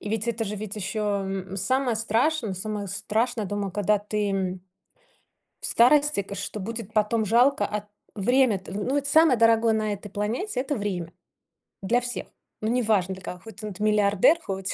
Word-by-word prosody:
и - - -6
ведь 220 +1 -2
это 225 -1 -1
же, 210 0 -4
ведь 210 0 -6
еще, 210 +2 -3
м, 195 -2 -2
самое 245 +5 +1
страшное 230 +2 +1
самое 205 +2 -4
страшное 215 +3 -1
дома, 205 0 -3
када 205 +2 +1
ты, 210 0 -2
м, 190 -1 -2 1.0
в - - -4
старости, 285 0 +4
к 200 - -8
что 205 +2 -5
будет 220 +1 -6
потом, 220 +1 +1
жалко, 245 +6 +3
а, 210 0 -5 0.3
время-то, 220 -2 +2
ну 205 +5 -3
вот, 280 0 0
самое 300 -2 +5
дорогое 230 0 +4
на 215 -1 0
этой 205 +1 -7
планете- 235 - -2
это 280 +2 -2
время. 180 -6 -3 0.7
Для 240 +6 +2
всех. 245 0 -5 0.3
Ну, 215 - -1
неважно 215 -6 +1
для 185 - -13
кого: 180 - -6
хоть 220 +1 -13
тн 215 - -5
т 200 - -10
миллиардер, 210 - +4
хоть 190 0 -3
210 Hz, 180 wpm, -25 LUFS, 200-235 Hz, 1.0 s, самое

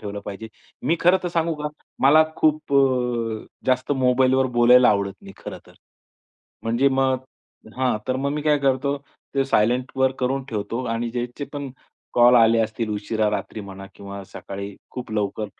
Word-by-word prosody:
ठेवलं 100 -1 -6
पाहिजे. 105 +2 -7 0.3
मी 165 - +1
खरंतर 180 +1 +3
सांगू 165 -1 0
का? 150 - -1 0.3
मला 155 +4 +7
खूप 155 -2 +1
अ, 125 -5 +1 0.2
जास्त 130 +2 +1
मोबाईलवर 130 0 +3
बोलायला 125 +1 +7
आवडत 100 -1 +1
नाही, 95 - -11
खरंतर. - - -10 0.9
म्हणजे 120 +5 +2
मग 130 -1 +1 0.5
हां, 130 -4 +1
तर 130 - +1
मग 140 +1 -1
मी 150 0 -3
काय 150 -1 +3
करतो, 140 +1 +1 0.4
ते 135 - +2
सायलेंटवर 130 +2 +1
करून 130 +1 0
ठेवतो. 115 +3 -3
आणि 115 0 -2
ज्याचे 120 +3 -4
पण 140 -2 -5 0.4
कॉल 120 +1 +6
आले 115 -1 +5
असतील, 110 0 -2
उशिरा, 105 +1 -1
रात्री 105 +1 -4
म्हणा 95 -1 -9
किंवा 100 0 -8
सकाळी 100 +1 -8 0.2
खूप 125 -3 -7
लवकर 105 0 -2
125 Hz, 155 wpm, -23 LUFS, 110-135 Hz, 0.9 s, मला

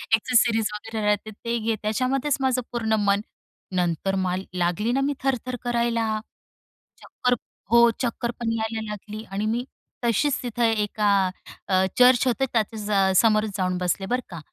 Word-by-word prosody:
Accessories 225 -1 +2
वगैरे 215 0 -4
राहते 210 +1 0
ते 235 +3 -3
घे, 225 0 0
त्याच्यामध्येच 255 +6 0
माझं 260 -1 +1
पूर्ण 225 -2 -1
मन. 200 0 +2 0.5
नंतर 180 +2 0
मला 185 0 -1
लागली 180 +6 0
ना 270 +2 +1
मी 285 +1 +1
थरथर 255 -2 -1
करायला. 235 -2 0 0.8
चक्कर 250 - -1 0.4
हो 235 0 +7
चक्कर 235 -1 -1
पण 230 -1 -1
यायला 220 0 -2
लागली 210 +1 -7
आणि 200 +2 -2
मी 230 +3 0 0.4
तशीच 255 +5 +1
तिथं 240 -1 -2
एका 210 -2 +1 0.6
अ, 190 0 +3
चर्च 250 0 +6
होतं 255 +2 +1
त्याच्या 210 -3 +1
समोरच 215 0 +3
जाऊन 185 -1 0
बसले 180 +2 -1
बरं 250 +6 0
का. 170 - -7
220 Hz, 150 wpm, -24 LUFS, 205-240 Hz, 0.8 s, हो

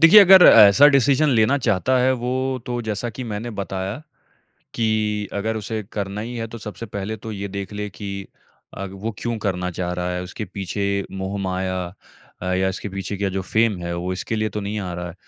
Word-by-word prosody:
देखिए, 165 +6 +10
अगर 190 -1 +9
ऐसा 110 +6 +8
डिसीज़न 140 +2 +3
लेना 125 +2 +3
चाहता 120 +4 +2
है 130 +1 +3
वो 125 +1 -1 0.3
तो 120 -1 -2
जैसा 110 +2 -3
की 125 +3 -7
मैंने 110 +1 -4
बताया 95 - -4 0.7
कि 105 -2 0
अगर 110 +2 -1
उसे 110 +1 -4
करना 100 0 -3
ही 120 +2 -6
है 115 0 -3
तो - - -6
सबसे 105 +2 -7
पहले 100 +2 -4
तो 110 +1 -7
ये 100 0 -5
देख 100 +1 -6
ले 105 0 -4
कि 100 +2 -7 0.7
अग 95 - -7
वो 115 0 -2
क्यों 120 -1 -2
करना 90 -3 -2
चाह 90 0 -3
रहा 90 0 -2
है? 90 - -3
उसके 95 +4 -6
पीछे 100 +1 -2
मोह-माया 95 -1 -2 0.6
अ, - - -4
या 95 0 +1
इसके 95 +2 -4
पीछे 95 0 -5
क्या 100 0 -1
जो 95 0 -2
फेम 110 +1 +1
है, 85 0 -3
वो 90 +2 -3
इसके 110 +4 -3
लिए 110 0 0
तो - - -1
नहीं 105 +2 -3
आ 90 -2 -4
रहा 90 0 -5
है। 85 - -9
105 Hz, 210 wpm, -22 LUFS, 95-115 Hz, 0.7 s, देखिए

